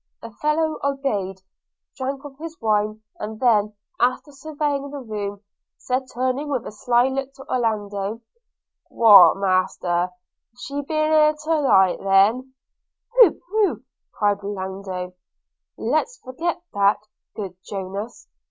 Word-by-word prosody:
The 230 Hz, -, -10 dB
fellow 305 Hz, +5 st, 0 dB
obeyed, 215 Hz, -10 st, -2 dB, 0.5 s
drank 270 Hz, +2 st, -4 dB
off 275 Hz, -1 st, -11 dB
his 325 Hz, 0 st, -8 dB
wine, 215 Hz, 0 st, 0 dB, 0.2 s
and 215 Hz, +1 st, -6 dB
then, 215 Hz, -4 st, +3 dB, 0.3 s
after 255 Hz, +4 st, 0 dB
surveying 290 Hz, -1 st, -3 dB
the 285 Hz, -, -7 dB
room, 205 Hz, -5 st, -5 dB, 0.4 s
said 255 Hz, +1 st, -2 dB
turning 260 Hz, +4 st, -1 dB
with 265 Hz, -5 st, -2 dB
a -, -, -6 dB
sly 240 Hz, +3 st, +2 dB
look 270 Hz, 0 st, -3 dB
to 270 Hz, -, -12 dB
Orlando, 210 Hz, -3 st, -2 dB, 0.7 s
'What, 220 Hz, -5 st, +7 dB
Master, 185 Hz, -2 st, 0 dB, 0.5 s
she 280 Hz, +3 st, -5 dB
ben't 280 Hz, -, -16 dB
here 310 Hz, 0 st, +4 dB
then 305 Hz, -, +1 dB
to 315 Hz, -1 st, +1 dB
night?' 190 Hz, -9 st, +4 dB, 1.1 s
'Pooh, 480 Hz, -8 st, +6 dB
pooh!' 420 Hz, +1 st, 0 dB, 0.3 s
cried 205 Hz, -1 st, +2 dB
Orlando, 190 Hz, -2 st, -5 dB, 0.6 s
'let's -, -, -1 dB
forget 335 Hz, +7 st, -4 dB
that, 200 Hz, +1 st, +3 dB, 0.4 s
good 195 Hz, -4 st, -6 dB
Jonas! 200 Hz, +3 st, -6 dB
245 Hz, 125 wpm, -22 LUFS, 205-285 Hz, 1.1 s, What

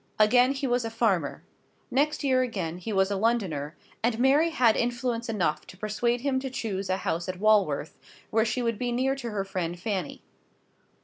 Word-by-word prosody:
Again 245 Hz, +5 st, +5 dB
he 275 Hz, 0 st, -3 dB
was 245 Hz, -1 st, +1 dB
a 225 Hz, -, -3 dB
farmer. 210 Hz, -9 st, 0 dB, 0.5 s
Next 295 Hz, +4 st, +1 dB
year 260 Hz, -2 st, +3 dB
again 185 Hz, -9 st, -3 dB
he 200 Hz, +5 st, -5 dB
was 190 Hz, -1 st, +2 dB
a -, -, +1 dB
Londoner; 190 Hz, -9 st, -1 dB, 0.3 s
and 225 Hz, 0 st, +1 dB
Mary 275 Hz, +7 st, +4 dB
had 245 Hz, -8 st, +3 dB
influence 240 Hz, -1 st, -1 dB
enough 170 Hz, -8 st, -1 dB
to 185 Hz, -, -12 dB
persuade 235 Hz, +4 st, -1 dB
him 265 Hz, -1 st, 0 dB
to 265 Hz, 0 st, -4 dB
choose 200 Hz, -6 st, -3 dB
a 185 Hz, -, +1 dB
house 170 Hz, -1 st, -2 dB
at 185 Hz, -1 st, -4 dB
Walworth, 200 Hz, -9 st, +2 dB, 0.3 s
where 220 Hz, 0 st, +3 dB
she 235 Hz, +2 st, -1 dB
would 230 Hz, -3 st, -1 dB
be 245 Hz, -1 st, -1 dB
near 260 Hz, +3 st, +1 dB
to 265 Hz, -3 st, -5 dB
her 200 Hz, -3 st, -2 dB
friend 175 Hz, -3 st, -3 dB
Fanny. 190 Hz, -4 st, -3 dB
225 Hz, 190 wpm, -27 LUFS, 190-245 Hz, 0.5 s, Again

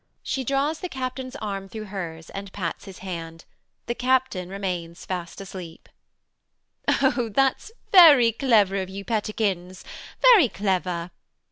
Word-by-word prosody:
She 265 Hz, -, -2 dB
draws 275 Hz, +5 st, 0 dB
the 365 Hz, -, -5 dB
captain's 255 Hz, -1 st, -5 dB
arm 195 Hz, -5 st, -5 dB
through 220 Hz, +1 st, -6 dB
hers, 170 Hz, -5 st, -7 dB
and 195 Hz, 0 st, -7 dB
pats 180 Hz, -3 st, -4 dB
his 195 Hz, -2 st, -10 dB
hand. 165 Hz, -3 st, -7 dB, 0.4 s
The 235 Hz, -, -1 dB
captain 250 Hz, -8 st, 0 dB
remains 180 Hz, -3 st, -5 dB
fast 180 Hz, -1 st, -5 dB
asleep. 185 Hz, -4 st, -9 dB, 1.0 s
MRS -, -, +4 dB
HUSHABYE. 265 Hz, -2 st, +2 dB
Oh, 230 Hz, -, -3 dB
that's 270 Hz, -, +1 dB, 0.2 s
very 295 Hz, -, +8 dB
clever 215 Hz, -5 st, +3 dB
of 190 Hz, -1 st, -3 dB
you, 195 Hz, +1 st, -7 dB
pettikins. 200 Hz, -4 st, -2 dB, 0.4 s
Very 445 Hz, -, +7 dB
clever. 180 Hz, -3 st, -2 dB
200 Hz, 140 wpm, -24 LUFS, 185-255 Hz, 1.0 s, very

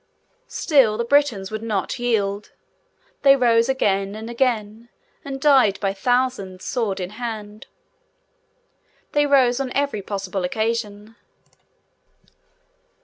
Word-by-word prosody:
Still, 260 Hz, -9 st, +2 dB
the 235 Hz, -, -1 dB
Britons 235 Hz, -8 st, +1 dB
would 215 Hz, 0 st, -4 dB
not 215 Hz, +1 st, -3 dB
yield. 210 Hz, -4 st, -1 dB, 0.7 s
They 275 Hz, -1 st, +7 dB
rose 235 Hz, -2 st, +3 dB
again 200 Hz, -6 st, 0 dB
and 220 Hz, +2 st, -7 dB
again, 235 Hz, -2 st, -1 dB, 0.3 s
and 270 Hz, -1 st, -6 dB
died 265 Hz, -8 st, +4 dB
by 195 Hz, -1 st, -1 dB
thousands, 245 Hz, -4 st, -1 dB
sword 220 Hz, -6 st, -2 dB
in 180 Hz, 0 st, -5 dB
hand. 215 Hz, -3 st, -6 dB, 1.4 s
They 290 Hz, 0 st, +2 dB
rose, 260 Hz, -3 st, +3 dB
on 265 Hz, -2 st, -3 dB
every 280 Hz, -7 st, -1 dB
possible 195 Hz, -1 st, -4 dB
occasion. 220 Hz, +1 st, -3 dB
225 Hz, 110 wpm, -22 LUFS, 205-255 Hz, 1.4 s, They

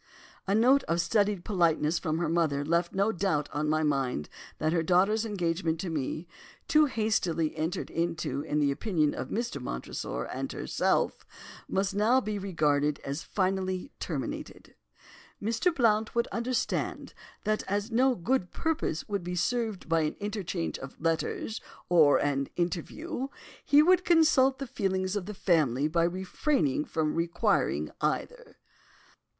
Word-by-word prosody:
A 195 Hz, -, +2 dB
note 255 Hz, +5 st, +5 dB
of 170 Hz, +1 st, 0 dB
studied 200 Hz, 0 st, +1 dB
politeness 170 Hz, -4 st, +2 dB
from 155 Hz, -2 st, -1 dB
her 170 Hz, -1 st, 0 dB
mother 155 Hz, -4 st, +1 dB
left 170 Hz, +3 st, 0 dB
no 200 Hz, +3 st, +2 dB
doubt 170 Hz, -7 st, 0 dB
on 150 Hz, +1 st, -1 dB
my 155 Hz, +1 st, +2 dB
mind 135 Hz, -, 0 dB, 0.3 s
that 155 Hz, +1 st, 0 dB
her 170 Hz, -, +2 dB
daughter's 195 Hz, +7 st, +2 dB
engagement 170 Hz, -4 st, -1 dB
to 180 Hz, -, -4 dB
me, 155 Hz, +3 st, -3 dB, 0.4 s
too 305 Hz, 0 st, +5 dB
hastily 185 Hz, -, 0 dB
entered 160 Hz, +3 st, -3 dB
into 165 Hz, -4 st, -2 dB
in 150 Hz, 0 st, -2 dB
the 145 Hz, -2 st, +3 dB
opinion 155 Hz, -2 st, 0 dB
of -, -, -5 dB
Mr. 230 Hz, -, -3 dB
Montresor 60 Hz, -, -4 dB
and -, -, -4 dB
herself, -, -, 0 dB, 0.4 s
must 195 Hz, +1 st, 0 dB
now 220 Hz, +6 st, +4 dB
be 215 Hz, -4 st, -3 dB
regarded 150 Hz, -6 st, +1 dB
as 140 Hz, +3 st, -3 dB
finally 185 Hz, -, -1 dB
terminated. -, -, -5 dB, 0.7 s
'Mr. 230 Hz, -, +1 dB
Blount 225 Hz, -7 st, +2 dB
would 235 Hz, -, +2 dB
understand 240 Hz, +1 st, -2 dB, 0.3 s
that, 215 Hz, 0 st, 0 dB
as 205 Hz, +3 st, -1 dB
no 255 Hz, +3 st, +3 dB
good 215 Hz, 0 st, 0 dB
purpose 320 Hz, -, -2 dB
would 200 Hz, -3 st, -2 dB
be 180 Hz, +1 st, -4 dB
served 220 Hz, +3 st, -1 dB
by 165 Hz, 0 st, +2 dB
an 150 Hz, -, -1 dB
interchange 200 Hz, -5 st, -3 dB
of 135 Hz, -, -10 dB
letters 165 Hz, +6 st, -1 dB, 0.3 s
or 160 Hz, -5 st, +6 dB
an 140 Hz, -1 st, 0 dB
interview, 195 Hz, -, -3 dB, 0.4 s
he 295 Hz, +1 st, +6 dB
would 365 Hz, +2 st, +4 dB
consult 310 Hz, -6 st, +4 dB
the 275 Hz, -, -4 dB
feelings 190 Hz, -4 st, -1 dB
of 200 Hz, -3 st, -3 dB
the 210 Hz, -, -6 dB
family 150 Hz, -, +2 dB
by 165 Hz, +2 st, +1 dB
refraining 185 Hz, -, 0 dB
from 155 Hz, -2 st, -1 dB
requiring 170 Hz, +1 st, 0 dB
either. -, -, -3 dB
180 Hz, 145 wpm, -29 LUFS, 160-220 Hz, 0.7 s, or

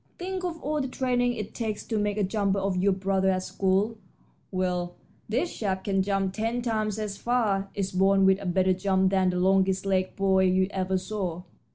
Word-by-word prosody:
Think 370 Hz, +1 st, -4 dB
of 340 Hz, -2 st, -3 dB
all 300 Hz, +1 st, -1 dB
the 265 Hz, -, -2 dB
training 245 Hz, -1 st, 0 dB
it 215 Hz, -4 st, -6 dB
takes 220 Hz, -3 st, -3 dB
to 220 Hz, -2 st, -1 dB
make 205 Hz, 0 st, -1 dB
a 210 Hz, -, +1 dB
jumper 200 Hz, 0 st, 0 dB
of 195 Hz, -1 st, 0 dB
your 190 Hz, +2 st, +2 dB
brother 190 Hz, 0 st, +1 dB
at 185 Hz, -1 st, 0 dB
school. 195 Hz, +4 st, 0 dB, 0.5 s
Well, 180 Hz, -1 st, -2 dB, 0.3 s
this 260 Hz, +11 st, -1 dB
chap 190 Hz, -3 st, -2 dB
can 195 Hz, -1 st, +1 dB
jump 195 Hz, -1 st, 0 dB
ten 230 Hz, +3 st, -2 dB
times 215 Hz, -3 st, -1 dB
as 210 Hz, -2 st, -4 dB
far. 205 Hz, -4 st, 0 dB
It's 195 Hz, -1 st, -2 dB
born 195 Hz, +1 st, +3 dB
with 190 Hz, +1 st, +4 dB
a 195 Hz, -, -4 dB
better 185 Hz, +1 st, +2 dB
jump 190 Hz, 0 st, +1 dB
than 190 Hz, -1 st, +3 dB
the 180 Hz, -, -1 dB
longest 190 Hz, +1 st, +2 dB
legged 185 Hz, -1 st, 0 dB
boy 190 Hz, -1 st, +3 dB
you 185 Hz, 0 st, +3 dB
ever 190 Hz, -1 st, 0 dB
saw. 185 Hz, -3 st, -4 dB
195 Hz, 200 wpm, -27 LUFS, 190-215 Hz, 0.5 s, with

